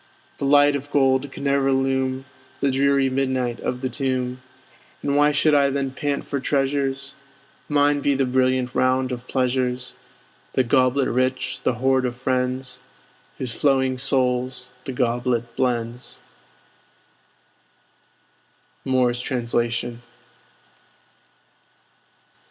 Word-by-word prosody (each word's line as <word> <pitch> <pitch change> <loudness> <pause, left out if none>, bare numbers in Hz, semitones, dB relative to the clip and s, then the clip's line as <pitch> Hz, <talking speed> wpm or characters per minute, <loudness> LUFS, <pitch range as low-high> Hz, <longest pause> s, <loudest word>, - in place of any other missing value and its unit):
The - - -1
light 145 0 +5
of 140 +1 -5
gold 135 -1 +2
can - - -8
ne'er 140 -1 +2
illume 135 0 0 0.3
The 140 - +1
dreary 140 0 +3
midnight 130 -2 -1
of 125 0 -3
the 130 - -1
tomb! 130 0 -2 0.6
And 140 - 0
why 145 +1 +5
should 150 +1 +3
I 140 -1 +4
then 135 -1 -2
pant 145 +1 -2
for 140 - -2
treasures? 140 0 -1 0.6
Mine 145 0 +3
be 140 0 +2
the 135 0 +1
brilliant 130 0 +1
round 130 0 +1
of 125 0 -6
pleasures; 125 -1 -1 0.6
The 130 - +3
goblet 130 +1 +2
rich, 130 +1 -1
the 125 - 0
hoard 130 +1 +2
of 120 - -5
friends, 125 0 -2 0.6
Whose 125 -3 -3
flowing 130 -1 +1
souls 125 -1 0
the 135 - -3
goblet 120 -1 -1
blends! 120 -1 -2 2.6
Moore's 125 -2 +1
Translation. 120 -1 -1
130 Hz, 115 wpm, -23 LUFS, 125-135 Hz, 2.6 s, light